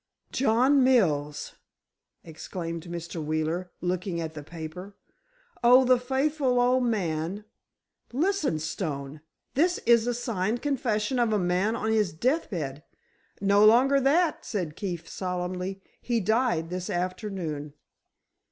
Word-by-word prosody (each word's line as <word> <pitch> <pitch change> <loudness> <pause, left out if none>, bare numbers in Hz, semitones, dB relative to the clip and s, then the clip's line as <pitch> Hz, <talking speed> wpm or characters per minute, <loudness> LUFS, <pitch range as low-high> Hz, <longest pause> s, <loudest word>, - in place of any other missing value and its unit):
"John 260 +2 +3
Mills!" 150 - +2 0.7
exclaimed 165 +1 -6
Mr. 170 -1 -5
Wheeler, 155 +4 -2
looking 180 0 -2
at 160 -1 -4
the 150 - -7
paper. 170 +5 -8 0.7
"Oh, 250 +2 +7
the 250 0 +4
faithful 265 0 +1
old 250 +1 +3
man! 190 -2 -2 0.7
Listen, 310 - 0
Stone. 150 -3 -4 0.3
This 350 +6 +2
is 235 0 +5
a 245 - 0
signed 230 -2 -2
confession 250 -4 0
of 235 -2 +2
a 215 - +2
man 185 +4 +1
on 220 -1 -1
his 210 -6 +1
death 255 - 0
bed——" 150 -7 -4 0.6
"No 200 +1 +4
longer 255 +6 +6
that," 305 +5 +2
said 175 -9 -3
Keefe, 175 -4 -5
solemnly, 180 +1 -4 0.2
"he 240 -2 0
died 220 -6 +1
this 180 +1 -4
afternoon." 180 -5 -3
195 Hz, 125 wpm, -27 LUFS, 170-245 Hz, 0.7 s, Oh